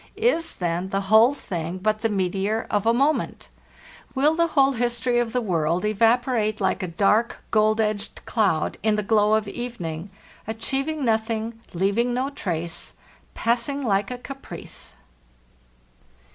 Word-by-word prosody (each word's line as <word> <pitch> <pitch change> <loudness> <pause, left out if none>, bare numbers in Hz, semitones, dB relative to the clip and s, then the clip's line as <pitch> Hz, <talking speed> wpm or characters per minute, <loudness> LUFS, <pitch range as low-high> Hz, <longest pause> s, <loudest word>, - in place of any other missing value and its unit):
Is, 405 -7 +1
then, 175 +1 -2
the 195 - 0
whole 235 +6 +7
thing 170 - -4
but 215 +3 0
the 225 - +1
meteor 195 +2 0
of 205 +1 +1
amoment? 275 +7 +1 0.7
Will 290 +4 +4
the 335 +1 +2
whole 270 0 +6
history 240 0 0
of 235 -2 0
the 250 - 0
world 170 -2 0
evap 225 +3 +3
orate 215 -4 0
like 190 - 0
a 185 - -2
dark, 210 +7 +1
gold 215 0 +3
edged 215 -1 -2
cloud 200 -9 +1
in 215 -1 +2
the 210 - -1
glow 210 0 +3
of 215 -1 0
even 240 -3 -5
ing—achieving 220 - -4
nothing, 225 0 -1
leaving 210 +7 +1
no 265 +3 -1
trace, 170 - -3 0.4
passing 245 +5 0
like 200 -4 +1
a 250 - -4
Caprice? 270 - -7
220 Hz, 145 wpm, -24 LUFS, 195-245 Hz, 0.7 s, whole